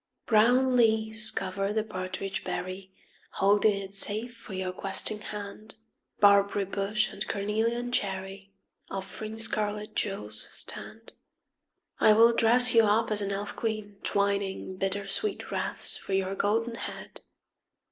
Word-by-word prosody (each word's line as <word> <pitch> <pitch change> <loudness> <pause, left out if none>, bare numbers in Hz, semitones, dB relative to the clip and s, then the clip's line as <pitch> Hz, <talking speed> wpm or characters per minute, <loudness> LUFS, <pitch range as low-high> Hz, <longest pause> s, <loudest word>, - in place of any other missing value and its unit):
Brown 250 +4 +4
leaves 220 -1 +3
cover 195 +2 -2
the 215 0 0
partridge 190 -1 -5
berry, 185 +1 -5 0.2
\ - - -32
Holding 205 +1 +3
it 195 0 -8
safe 215 +4 +2
for 230 -3 -11
your 185 0 -3
questing 195 +3 -1
hand. 210 +1 -8 0.4
Barberry 200 0 +4
bush 200 +2 -1
and - - -4
cornelian 225 +4 -1
cherry 195 -2 -3 0.4
Offering 215 +3 -6
scarlet 210 -1 0
jewels 110 - -1
stand. - - -7 0.9
I 215 - +6
will 230 +2 +6
dress 240 +2 +5
you 230 -1 +6
up 215 +2 +2
as 210 -1 +6
an 200 0 -2
elf 200 +1 -4
queen, 215 -3 -4
twining 200 -1 -1
Bittersweet 195 - -2
wreaths - - -3
for 195 - -6
your 190 0 0
golden 225 +4 0
head. - - -7
205 Hz, 130 wpm, -28 LUFS, 195-220 Hz, 0.9 s, I